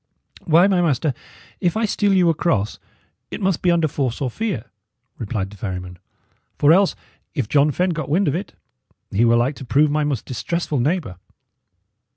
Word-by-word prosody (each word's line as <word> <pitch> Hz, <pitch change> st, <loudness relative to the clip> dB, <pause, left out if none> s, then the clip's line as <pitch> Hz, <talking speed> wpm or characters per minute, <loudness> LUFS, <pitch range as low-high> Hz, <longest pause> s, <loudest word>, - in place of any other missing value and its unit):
"Why, 170 Hz, +2 st, +5 dB
my 190 Hz, -3 st, +3 dB
master, 150 Hz, -3 st, +1 dB, 0.5 s
if 180 Hz, +2 st, 0 dB
I 225 Hz, -, +1 dB
steal 205 Hz, -1 st, +1 dB
you 185 Hz, -3 st, +4 dB
across, 125 Hz, -, -1 dB, 0.5 s
it -, -, -6 dB
must 190 Hz, -4 st, 0 dB
be 180 Hz, -, +2 dB
under 170 Hz, -2 st, +3 dB
force 135 Hz, -4 st, -2 dB
or 130 Hz, -3 st, -2 dB
fear," 210 Hz, -, -4 dB, 0.5 s
replied 100 Hz, -4 st, -3 dB
the 105 Hz, -, -13 dB
ferryman; 90 Hz, -2 st, -6 dB, 0.6 s
"for 145 Hz, +2 st, +5 dB
else, 195 Hz, +2 st, +3 dB, 0.4 s
if 130 Hz, -6 st, -1 dB
John 145 Hz, +4 st, +3 dB
Fenne 180 Hz, +5 st, 0 dB
got 155 Hz, -4 st, -4 dB
wind 180 Hz, +6 st, +2 dB
of 140 Hz, -, +1 dB
it, 180 Hz, +5 st, -5 dB, 0.6 s
he 110 Hz, +5 st, +3 dB
were 115 Hz, 0 st, +4 dB
like 120 Hz, +4 st, +2 dB
to -, -, -8 dB
prove 145 Hz, +4 st, +2 dB
my 150 Hz, 0 st, +1 dB
most 140 Hz, -6 st, -2 dB
distressful 150 Hz, +3 st, -2 dB
neighbour." 145 Hz, -, -1 dB
150 Hz, 180 wpm, -21 LUFS, 120-175 Hz, 0.6 s, Why